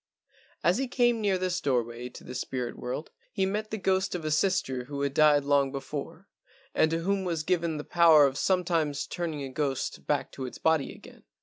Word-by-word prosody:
As - - +3
he 270 - -1
came 240 -2 +2
near 200 -3 +2
this 180 -1 -1
doorway 120 -2 -1
to - - -12
the 125 - -8
spirit 125 -1 -3
world 130 +5 -5 0.2
he 190 - 0
met 210 +3 -2
the 220 - -3
ghost 190 -1 0
of 165 -3 -5
a 155 - -1
sister 150 -7 +1
who 140 +1 -5
had 140 -1 -1
died 150 -1 +5
long 140 -1 +2
before, 145 +6 -6 0.5
and 155 - +3
to 165 +1 -1
whom 195 +2 0
was 170 -4 -2
given 170 -2 0
the 150 - -5
power 165 -4 +6
of 135 -1 0
sometimes 165 -5 0
turning 160 -5 -4
a 135 - -5
ghost 135 -1 -3
back - - 0
to 130 -1 -5
its - - -9
body 160 -3 +1
again. - - -14
155 Hz, 205 wpm, -28 LUFS, 140-185 Hz, 0.5 s, power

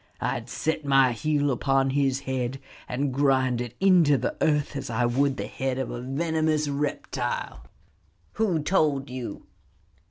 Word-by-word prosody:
I - - -1
would - - -13
set 160 -1 -2
my 135 -2 +4
heel 145 +4 0
upon 135 +1 +1
his 135 -1 +1
head 130 -1 -3 0.3
and 135 +1 -1
grind 130 -3 +2
it 120 -1 -6
into 175 -7 +5
the - - -2
earth 150 -1 +1
as 140 - -4
I 120 +1 +1
would 135 +3 +1
the - - -3
head 130 -1 -3
of 130 - -3
a 120 - -5
venomous 155 +3 0
reptile." 140 - -3 0.7
"Who 185 -9 0
told 150 -7 +1
you?" 125 -2 -6
135 Hz, 155 wpm, -26 LUFS, 130-150 Hz, 0.7 s, into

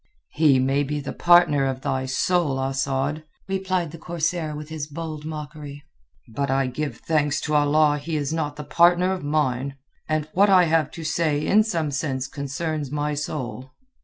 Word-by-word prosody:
"He 150 -4 +4
may 135 +2 +2
be 145 +1 -2
the 140 - -5
partner 175 -6 +4
of 130 -1 -3
thy 130 -1 -2
soul, 145 0 +1
Asad," 135 +2 -1 0.2
replied 185 -4 -1
the 165 - -10
corsair 170 -2 -2
with 150 +1 -8
his 155 -2 -5
bold 155 0 -6
mockery, 150 -2 -7 0.4
"but 135 +5 -3
I 135 0 +2
give 140 +4 -4
thanks 150 -2 0
to 150 - -3
Allah 150 0 +3
he 160 +3 -4
is 145 0 -1
not 150 -3 -2
the 150 - -7
partner 175 +4 +4
of 185 - -5
mine. 140 -2 -1 0.3
And 155 -1 0
what 200 +3 +4
I 185 -2 +6
have 160 -3 +2
to 165 - -7
say 155 -1 0
in 215 +2 +5
some 165 -9 -1
sense 135 -2 -2
concerns 145 +2 -4
my 150 +1 -1
soul." 130 -3 -5
150 Hz, 175 wpm, -24 LUFS, 140-165 Hz, 0.4 s, I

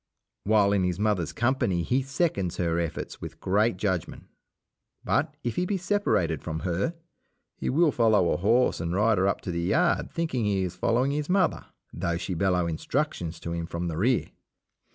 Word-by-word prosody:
While 105 -1 +4
in 100 -2 +2
his 90 -1 0
mother's 105 -6 0
company 115 -8 0
he 125 +10 +1
seconds 135 - -1
her 85 -1 0
efforts 85 -2 -4
with - - -8
great 105 +2 +1
judgment. 95 -4 -2 0.8
But, - - 0
if 120 -2 -3
he 180 - +1
be 200 - 0
separated 175 - 0
from 80 -1 -4
her, 95 - -1 0.6
he - - -3
will 155 +3 +3
follow 110 -8 +3
a - - +1
horse 115 +7 +2
and 85 +1 -2
rider 105 -2 +3
up 100 - 0
to 90 - -4
the 85 0 -2
yard 85 - +1
thinking 145 -9 -1
he 100 -2 +1
is 90 -1 -4
following 120 +8 +1
his 150 +2 -2
mother, 185 -2 +1 0.3
though 85 0 -1
she 90 +1 -4
bellow 90 -1 +1
instructions 85 - -2
to 85 - -4
him 85 -1 -3
from 85 +1 -3
the 80 - -4
rear. 120 +7 +1
100 Hz, 180 wpm, -27 LUFS, 85-125 Hz, 0.8 s, While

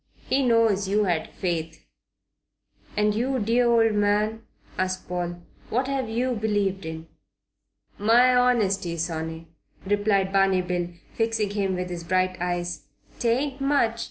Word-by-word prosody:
He 275 - +2
knows 225 -5 +3
you 210 +2 +2
had 175 -5 -1
faith." 165 -3 -4 1.1
"And 210 0 +3
you, 255 +5 0
dear 240 +2 +2
old 225 -2 +4
man?" 210 +2 +1 0.3
asked 185 0 -2
Paul, 175 -1 -4 0.3
"what 255 +3 0
have 270 -4 -2
you 245 +3 0
believed 205 -4 -1
in?" 160 0 -6 0.9
"My 240 +4 +5
honesty, 200 -8 +2
sonny," 160 0 -4 0.4
replied 200 -1 +1
Barney 195 -1 +3
Bill, 180 -1 -2 0.3
fixing 225 -2 0
him 195 -2 -1
with 180 0 -4
his 170 -1 -5
bright 185 +2 +1
eyes. 175 -4 -3 0.3
"'Tain't 265 +4 0
much. 275 -5 +2
205 Hz, 130 wpm, -25 LUFS, 180-230 Hz, 1.1 s, My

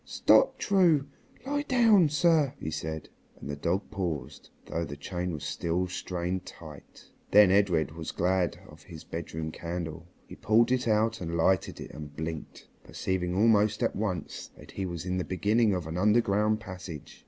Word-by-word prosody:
"Stop, - - +3
True; 175 -8 +3 0.4
lie 290 +1 -1
down, 225 - +4
sir!" 150 -2 +3
he 80 - -4
said, 80 -1 -5 0.3
and - - -9
the 70 - -3
dog 85 +7 -2
paused, 80 -9 -4 0.2
though 85 - -3
the 75 -2 -7
chain 90 +4 -4
was 75 -3 -6
still 85 +4 -1
strained 90 0 -3
tight. 75 -5 -13 0.2
Then 105 -2 +7
Edred 90 -6 +2
was 80 0 -6
glad 90 0 0
of 75 +1 -15
his 80 -4 -11
bedroom 80 -1 -5
candle. 85 -1 -6 0.2
He - - -12
pulled 115 +3 +3
it 130 -1 +1
out 110 0 +1
and 85 -1 -3
lighted 90 +2 +1
it - - -8
and 75 -1 -9
blinked, 80 0 -6 0.2
perceiving 90 -1 -2
almost 105 0 +3
at - - 0
once 100 -5 -4
that - - -13
he 95 -1 -4
was 85 -1 -6
in 90 0 -1
the - - -1
beginning 105 +5 +2
of 90 -3 -3
an 80 +3 -4
underground 105 0 +2
passage. 90 -7 -9
90 Hz, 170 wpm, -28 LUFS, 80-110 Hz, 0.4 s, Then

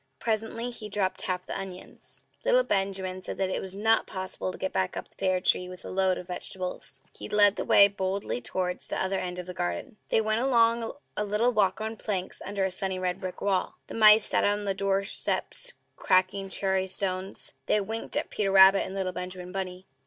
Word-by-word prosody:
Presently 225 +2 -2
he 220 -3 -7
dropped 195 -2 -1
half 180 0 -2
the - - -5
onions. 190 -2 -9 0.2
Little - - +4
Benjamin 195 - -2
said - - -6
that 190 -1 0
it - - -1
was 190 0 -6
not 220 +2 +2
possible 185 0 -4
to - - -10
get 190 - -3
back 185 -1 -1
up - - -5
the - - -28
pear 185 -1 +1
tree 180 0 +1
with 185 0 -11
a - - -6
load 190 -1 +2
of - - -7
vegetables. 180 0 -5
He - - -8
led 205 -1 +6
the - - -2
way 200 - +7
boldly 190 -8 -3
towards 180 +7 -2
the - - -3
other 190 0 0
end 180 -1 -4
of 180 - -5
the 180 - -7
garden. 90 - -4
They - - +3
went 215 +1 +1
along 230 -3 +3 0.2
a 210 - -1
little 210 +4 +1
walk 200 -1 +2
on 220 +1 -4
planks, 190 -4 -3
under 195 0 -1
a 190 - -1
sunny, 190 0 -1
red 185 0 -2
brick 185 -1 -6
wall. 195 -2 0
The - - -10
mice 215 -1 +7
sat - - +1
on 205 0 +1
their 195 - 0
doorsteps 195 - +1 0.2
cracking 185 +1 +1
cherry 190 -1 0
stones; 190 0 -3
they 210 - +3
winked 220 +3 -3
at - - -2
Peter 200 -2 0
Rabbit 195 0 +8
and 190 - -6
little 190 -1 -1
Benjamin 180 0 -7
Bunny. 185 -1 -5
195 Hz, 210 wpm, -28 LUFS, 185-210 Hz, 0.2 s, Rabbit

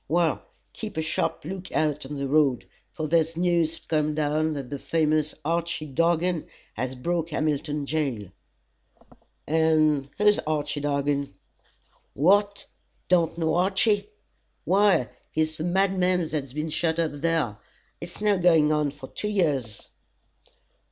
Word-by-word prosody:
"Well, 165 0 +1 0.3
keep 215 -6 -7
a 160 - 0
sharp 160 - -2
look 185 +2 -6
out 150 -3 0
on 145 - -6
the 140 0 -2
road, 140 -4 +2 0.3
for 155 -1 -4
there's 165 +1 +1
news 170 -2 +1
come 150 -1 0
down 155 +1 0
that 140 -3 -6
the 140 - -4
famous 155 -1 0
Archy 170 -1 -1
Dargan 165 +3 0 0.3
has 130 +3 -3
broke 170 +5 -2
Hamilton 150 -1 -1
jail." 135 - -2 1.2
"And 155 -3 +2
who's 210 0 +4
Archy 150 -1 -2
Dargan?" 140 -4 -1 0.8
"What! 200 +7 +3 0.4
don't 170 -2 +2
know 160 -2 0
Archy? 200 - +2 0.6
Why, 195 - +3 0.2
he's 155 0 -1
the 160 - -3
madman 185 -1 +1
that's 140 -4 -4
been 155 +2 -3
shut 160 +1 0
up 165 -2 +1
there, 160 -10 0 0.4
it's 170 +1 -9
now 210 -1 +2
guine 165 -4 +4
on 150 -2 +1 0.2
two 210 - -3
years." 145 - -1
155 Hz, 130 wpm, -26 LUFS, 145-175 Hz, 1.2 s, who's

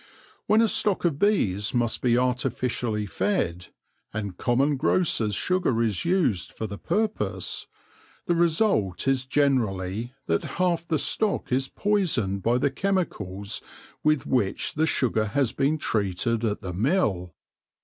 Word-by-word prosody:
When 215 +2 +5
a - - +4
stock 205 -3 +1
of 150 -5 0
bees 105 - +1
must 120 -2 0
be 120 -1 +3
artificially 125 -3 -1
fed, 90 - -1 0.4
and 100 -4 -4
common 135 +8 +1
grocers' 130 - +2
sugar 180 - +1
is 105 - -1
used 165 - +1
for 110 - -4
the 100 -1 -7
purpose, 220 0 -2 0.6
the 175 - +2
result 165 - +1
is 135 -1 +1
generally 120 -5 0
that 85 0 0
half 175 -2 +1
the 160 - +1
stock 210 +6 0
is 130 +1 +1
poisoned 155 - +1
by 120 +5 +2
the 135 +2 +1
chemicals 105 - -2 0.4
with 155 -2 +2
which 105 -7 0
the 160 +1 +1
sugar 115 -7 +1
has 120 +3 0
been 145 +3 +1
treated 110 - -1
at 105 -2 -1
the 90 -3 -5
mill. 95 - 0
125 Hz, 140 wpm, -25 LUFS, 105-170 Hz, 0.6 s, When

